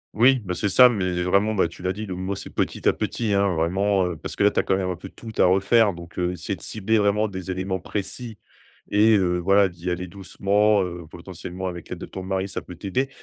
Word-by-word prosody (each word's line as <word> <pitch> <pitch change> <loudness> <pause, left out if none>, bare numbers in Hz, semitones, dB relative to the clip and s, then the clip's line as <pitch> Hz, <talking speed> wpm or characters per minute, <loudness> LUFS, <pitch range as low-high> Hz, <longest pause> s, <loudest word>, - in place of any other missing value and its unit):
Oui, 125 +4 +5
bah, 90 - -2
c'est 90 +4 -1
ça, 125 +7 +8
mais 95 -6 -1
vraiment, 100 +4 +2
bah, 95 - +3
tu 85 - -13
l'as 90 +1 0
dit 105 +3 -5
le 95 - -5
mot 95 +2 -3
c'est - - -8
petit - - -1
à - - +5
petit, 110 -3 -2
hein, 100 0 +3
vraiment, 95 +4 +1
heu, 90 -1 -3
parce - - -7
que - - 0
là 105 - +5
tu - - 0
as - - +2
quand 95 - +1
même 95 -1 -1
un - - -3
peu 95 +3 -10
tout 115 - -10
à - - +6
refaire 100 +3 +4
donc, 85 0 -9
heu, 90 0 0
essayer 90 - -4
de - - -17
cibler 110 +1 0
vraiment 105 +1 +2
des 95 -2 -7
éléments 95 +1 -2
précis 105 +4 -5 0.5
et 110 +2 +5
heu, 90 -2 +1
voilà, 100 +2 +4
d'y 85 +1 -6
aller 90 +1 -2
doucement, 100 +2 +1
heu, 85 -2 -6
potentiellement 90 +1 -8
avec 85 -2 -6
l'aide - - -5
de - - -7
ton 95 - -8
mari, 95 +1 -2
ça 95 - -5
peut 90 - -11
t'aider. 100 +10 -2
95 Hz, 255 wpm, -24 LUFS, 90-105 Hz, 0.5 s, ça